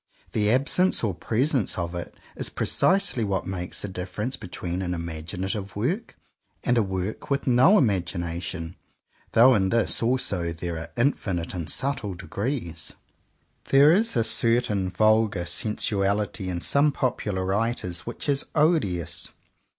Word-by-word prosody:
The 105 -1 +1
absence 140 +10 +2
or 105 -4 +1
presence 125 - 0
of 85 -1 -3
it 85 -1 -6 0.2
is - - -3
precisely 195 - +1
what 100 -2 -1
makes 90 -2 -4
the - - -2
difference 95 +6 -4
between 90 -2 -5
an 90 -1 -2
imaginative 90 +5 -4
work 175 - -2 0.5
and 125 - +2
a 115 - +4
work 95 +5 -4
with 140 0 0
no 130 - +6
imagination, 85 - -2 0.6
though 125 +3 +7
in 95 -4 +2
this 115 0 +2
also 115 -8 0
there 85 0 -4
are 80 0 -7
infinite 100 -9 0
and 85 -4 -4
subtle 125 -8 -1
degrees. 95 - -4 0.7
There 140 +3 +6
is 215 +3 +3
a 115 - +3
certain 110 -5 +2
vulgar 110 -3 +2
sensuality 100 +1 -1
in 85 -1 -3
some 145 - +3
popular 105 -9 -1
writers 95 -3 -1
which - - -5
is 140 -1 +1
odious. 90 - +1
100 Hz, 135 wpm, -25 LUFS, 90-125 Hz, 0.7 s, though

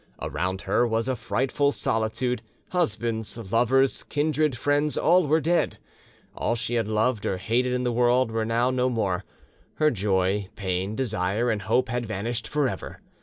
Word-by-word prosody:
Around 95 +1 -2
her 120 - +2
was 115 +1 0
a 130 - 0
frightful 135 +4 0
solitude: 115 +1 -1 0.3
husbands, 115 - -1
lovers, 130 +3 +3
kindred, 150 -2 0
friends, 145 +3 +1
all 175 0 +4
were 155 +3 +4
dead; 170 +2 +1 0.6
all 115 - 0
she 120 +1 -3
had 115 -3 +1
loved 110 +1 +1
or 95 - -1
hated 120 +7 0
in 125 0 0
the 125 - +1
world 120 0 +3
were 110 0 0
now 115 +3 +1
no 130 0 +1
more; 100 -6 -1 0.5
her 155 -1 +3
joy, 95 -1 0
pain, 95 +1 -2
desire, 110 -1 0
and 105 -2 -2
hope 115 +6 +1
had 120 0 -2
vanished 110 +2 -3
for 150 -2 +1
ever. - - -6
120 Hz, 165 wpm, -26 LUFS, 110-130 Hz, 0.6 s, all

